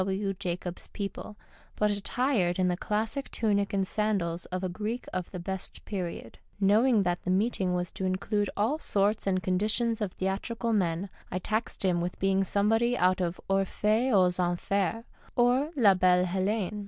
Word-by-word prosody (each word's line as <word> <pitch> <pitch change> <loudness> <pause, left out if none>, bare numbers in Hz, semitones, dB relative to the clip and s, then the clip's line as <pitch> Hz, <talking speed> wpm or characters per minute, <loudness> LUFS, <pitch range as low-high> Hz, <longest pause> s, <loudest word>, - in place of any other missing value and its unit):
W. 195 +1 -1
Jacobs's 180 -2 -5
people, 205 +1 -6 0.4
but 210 0 +2
attired 205 -3 0
in 185 -1 +2
the 180 - +1
classic 220 +8 -2
tunic 200 -3 0
and 195 -1 +1
sandals 190 -5 -1
of 185 +1 -4
a - - +1
Greek 215 +7 -4
of 185 -2 -3
the 185 - -7
best 190 +1 -5
period. 175 - -5 0.2
Knowing 215 +3 +4
that 175 -1 -1
the - - -5
meeting 190 -2 +1
was 180 -1 -2
to 190 - -4
include 200 +2 0
all 230 +10 +1
sorts 205 -5 +1
and 185 -1 +1
conditions 215 +5 +1
of 200 -3 -2
theatrical 225 +5 -2
men, 180 -2 0 0.2
I - - -1
taxed 215 +2 -2
him 175 -2 +2
with 175 +1 -3
being 195 0 +2
somebody 225 +5 +2
out 185 +1 +3
of 175 0 -2
Orjohce 195 0 +1 0.7
mtx 175 -1 +2
Enfers 200 +5 -1 0.3
or 250 +4 +3
La 210 -6 +6
Belle 180 -1 +4
Ilelene. 195 +3 -1
195 Hz, 165 wpm, -29 LUFS, 185-215 Hz, 0.7 s, La